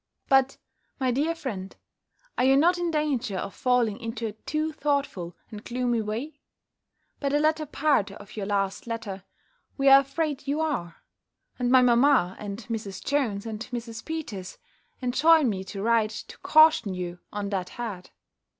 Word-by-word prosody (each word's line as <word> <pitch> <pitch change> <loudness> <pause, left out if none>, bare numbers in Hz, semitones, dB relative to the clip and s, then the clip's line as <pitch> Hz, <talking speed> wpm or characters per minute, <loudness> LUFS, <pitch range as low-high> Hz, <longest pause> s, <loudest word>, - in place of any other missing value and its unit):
But, 270 0 +3 0.4
my 260 -2 +1
dear 300 +7 0
friend, 195 - -6 0.6
are - - +1
you 270 +1 +5
not 350 +5 +4
in 350 -1 0
danger 280 - -1
of 195 +2 -4
falling 245 -5 +1
into 230 0 -4
a 220 - -2
too 305 +9 -3
thoughtful 280 - -2
and 210 -1 -8
gloomy 245 -2 0
way? 225 +9 -5 0.8
By 280 - 0
the 290 +1 +2
latter 310 0 +1
part 280 -8 +1
of 200 0 -12
your 200 -3 -4
last 200 +1 -1
letter, 210 -5 -5 0.5
we 275 -1 +4
are 270 0 +10
afraid 285 0 -3
you 285 +2 0
are; 275 - -3 0.6
and 245 -1 +1
my 255 0 +6
mamma, 240 -6 +4
and 205 +2 -6
Mrs. 215 -4 -5
Jones, 235 -8 0
and 220 -2 -5
Mrs. 230 -2 -5
Peters, 235 - -6 0.5
enjoin 295 +4 +4
me 190 -4 -2
to 195 +1 -6
write, 230 -1 +3
to 220 - -9
caution 310 -11 +5
you 175 -1 -5
on 205 -1 -3
that 185 -2 -2
head. 210 -7 -6
240 Hz, 160 wpm, -26 LUFS, 205-285 Hz, 0.8 s, are